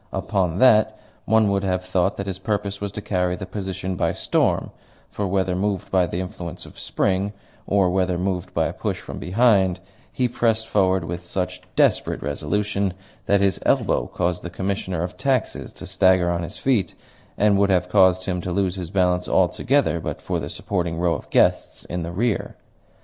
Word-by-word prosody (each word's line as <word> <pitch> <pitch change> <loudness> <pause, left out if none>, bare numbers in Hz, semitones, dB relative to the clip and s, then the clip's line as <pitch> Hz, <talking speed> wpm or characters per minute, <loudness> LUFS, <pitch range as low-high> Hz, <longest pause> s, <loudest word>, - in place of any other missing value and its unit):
Upon 90 -3 -1
that 110 -2 +5 0.3
one 110 -1 +4
would 100 0 +1
have 90 -1 -1
thought 90 +1 0
that 100 - -3
his 95 -1 -4
purpose 100 0 -2
was 100 -1 -3
to 105 - -6
carry 90 -3 0
the 95 - -6
position 95 -2 -4
by - - 0
storm; - - 0 0.4
for, 100 - -3
whether 95 -1 0
moved 100 +1 -2
by 90 -2 +3
the 85 - -3
influence 90 -2 -6
of - - -13
spring, 100 +2 0 0.3
or 95 -3 +3
whether 90 -1 +1
moved 90 -1 -2
by - - +1
a - - -2
push - - -3
from - - -8
behind, 95 -2 +3 0.3
he 125 - +1
pressed 115 -2 0
forward 95 -3 +2
with 85 +1 -5
such 90 +1 -3
desperate - - +2
resolution 100 +7 -1 0.3
that 100 0 +3
his 100 -3 +2
elbow - - +2
caused 90 0 -1
the 90 - -6
Commissioner 95 -1 -2
of 90 - -5
Taxes 135 -3 -1
to - - -9
stagger 95 -1 +3
on 85 0 -1
his 85 -1 -6
feet, 110 -10 0 0.4
and 100 -1 +3
would 100 0 +3
have 90 -1 +2
caused 95 -1 +4
him 90 -2 -2
to 90 - -4
lose 95 -1 +1
his 90 -3 -5
balance 90 -2 +1
altogether 105 +3 +2
but - - -4
for - - -2
the - - -5
supporting 85 -4 -2
row 85 0 +2
of - - -6
guests - - +2
in 90 +1 -4
the 85 +1 -4
rear. 110 +4 -1
95 Hz, 190 wpm, -23 LUFS, 90-100 Hz, 0.4 s, that